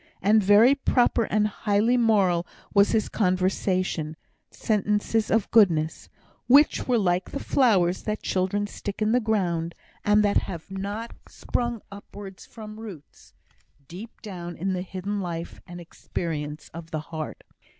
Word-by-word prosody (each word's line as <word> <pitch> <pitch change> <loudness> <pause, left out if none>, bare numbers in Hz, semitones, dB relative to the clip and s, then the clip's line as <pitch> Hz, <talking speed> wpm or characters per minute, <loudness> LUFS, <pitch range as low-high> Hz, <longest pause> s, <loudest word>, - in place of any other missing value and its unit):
And 215 +3 +4
very 210 +7 +6
proper 245 -4 +2
and 210 0 +1
highly 210 +3 +1
moral 200 -7 +2 0.3
was 200 0 +5
his 220 -1 +1
conversation; 185 -4 0 0.3
set 215 -2 0
sentences 210 +1 0
of 225 -3 +1
goodness, 165 -8 +3 0.4
which 280 +5 +5
were 250 -2 +3
like 180 -3 0
the 280 - -4
flowers 190 -12 +2
that 215 0 -4
children 190 +2 0
stick 205 -1 -6
in 215 0 +1
the 250 - +4
ground, 175 -7 -1 0.3
and 210 0 +4
that 205 -1 +2
have 170 +1 -4
not 205 +4 -5
sprung 240 -2 -3
upwards 200 -1 -11
from 215 -1 -10
roots 195 -10 -12 0.5
deep 200 +10 -11
down 175 -5 -7
in 190 +3 -1
the 180 - -2
hidden 190 +2 -4
life 170 -2 -6
and 175 0 -9
experience 155 -3 -5
of 165 0 -9
the 155 - -3
heart. 155 -1 -5
200 Hz, 145 wpm, -25 LUFS, 175-220 Hz, 0.5 s, very